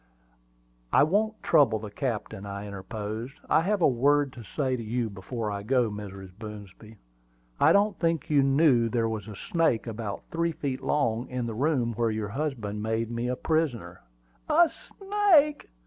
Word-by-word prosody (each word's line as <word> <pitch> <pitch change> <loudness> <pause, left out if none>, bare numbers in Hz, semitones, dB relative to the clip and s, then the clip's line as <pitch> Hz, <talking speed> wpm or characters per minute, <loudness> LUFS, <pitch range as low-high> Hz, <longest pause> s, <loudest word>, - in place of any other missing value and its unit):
"I - - +6
won't 215 +7 0
trouble 140 -9 +4
the 105 -1 -8
captain," 110 -4 -4
I 100 0 -6
interposed. 105 +5 -6
"I - - +4
have 195 +1 0
a - - +7
word 140 +2 +2
to 120 - -10
say 130 +2 -1
to 120 - -5
you 115 0 -2
before 105 +3 -4
I 100 0 -4
go, 120 +1 +1
Mrs. 100 -2 -8
Boomsby. 105 0 -10 0.6
I - - +6
don't 205 0 +3
think 165 -4 0
you 145 -2 +4
knew 135 -4 +4
there 115 -1 +1
was 110 -2 -4
a 105 - -8
snake 160 - 0
about 110 -3 -5
three 170 0 0
feet 135 -4 -3
long 120 -4 0
in 125 -1 -3
the 115 - -4
room 125 -1 0
where 115 +1 0
your 110 -1 -3
husband 115 -6 -3
made 110 +1 -1
me 120 +1 -2
a 125 - -1
prisoner." 125 - -1 0.5
"A 335 +2 +5
snake!" 385 -8 +2
120 Hz, 170 wpm, -27 LUFS, 110-150 Hz, 0.6 s, a